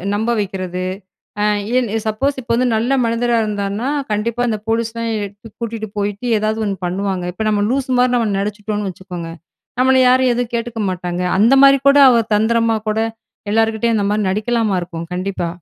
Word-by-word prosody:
நம்ப 220 +3 -1
வைக்கிறது. 185 -2 -3 0.6
ஆ - - +2 0.3
ஏன் 250 -3 +1 0.2
சப்போஸ் 265 +6 -1
இப்போ 235 -1 -2
வந்து 255 +1 +2
நல்ல 230 +4 0
மனிதரா 235 +1 +1
இருந்தாருன்னா, 205 +3 -2 0.2
கண்டிப்பா 225 +3 -1
அந்த 215 -2 -1
போலீஸ்லாம் 230 0 -1 0.5
கூட்டிட்டு 225 -2 -4
போயிட்டு, 205 +3 -3
ஏதாவது 215 +1 -1
1 200 -2 -2
பண்ணுவாங்க. 190 0 -2
இப்போ 220 +4 -3
நம்ம 205 -1 +1
லூசு 265 +1 -1
மாரி 250 0 +3
நம்ம 230 -3 +1
நடிச்சிட்டோன்னு 205 0 -3
வச்சுக்கோங்க. 180 -2 -7 0.5
நம்மள 260 +1 +4
யாரும் 255 0 +4
எதுவும் 240 -1 -2
கேட்டுக்க 235 -1 -4
மாட்டாங்க. 180 -1 -3 0.2
அந்த 225 +6 +5
மாதிரி 275 0 +7
கூட 280 - +5
அவர் 230 -3 +2
தந்திரமா 225 +1 +2
கூட 215 +1 0 0.5
எல்லாருக்கிட்டயும் 225 +1 +1
அந்தமாரி 205 +1 0
நடிக்கலாமா 215 +1 0
இருக்கும் 170 -1 -6
கண்டிப்பா. 185 -1 -2
220 Hz, 160 wpm, -18 LUFS, 200-235 Hz, 0.6 s, மாதிரி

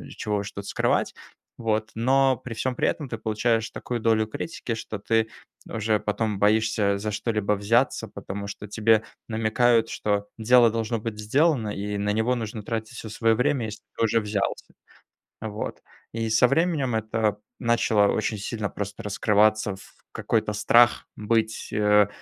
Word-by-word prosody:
чего 105 -1 -2
уж 100 0 -4
тут 100 0 -8
скрывать, - - 0 0.4
вот. 110 -1 -1
Но 130 +3 +3
при 120 +1 -8
всём 130 +3 -2
при - - +1
этом 145 -4 -2
ты - - -4
получаешь 115 +1 0
такую 120 -1 -4
долю 110 -1 +2
критики, 120 0 -5
что 110 -1 -6
ты 110 +2 +1 0.4
уже 110 -1 0
потом 105 0 -2
боишься 105 -1 +2
за 105 +2 -3
что-либо 105 -1 -1
взяться, 105 +3 +1
потому 100 +1 -7
что 100 0 -7
тебе 110 +1 +3 0.2
намекают, 115 +1 +2
что 105 -1 -1
дело 120 +1 +5
должно 115 0 -2
быть 105 -1 -5
сделано, 135 +3 +2
и 105 0 -3
на 105 +1 0
него 110 +4 +1
нужно 110 -2 -5
тратить 110 +2 -4
всё 110 - -7
свое 115 +1 +2
время, 125 +1 +1
если 105 -1 -7 0.2
ты 115 - +2
уже 115 +1 +2
взялся. 105 -2 -3 0.7
Вот. 110 -1 -5 0.3
И 115 0 -2
со 110 +3 +5
временем 150 -4 +1
это 110 -1 0 0.2
начало 115 -3 +3
очень 110 0 -1
сильно 105 +1 -3
просто 100 0 -6
раскрываться 105 0 +2
в - - -16 0.2
какой-то 110 -2 -1
страх 120 +3 +4
быть, 110 +1 -1
э, 105 -1 +4
110 Hz, 160 wpm, -25 LUFS, 105-115 Hz, 0.7 s, дело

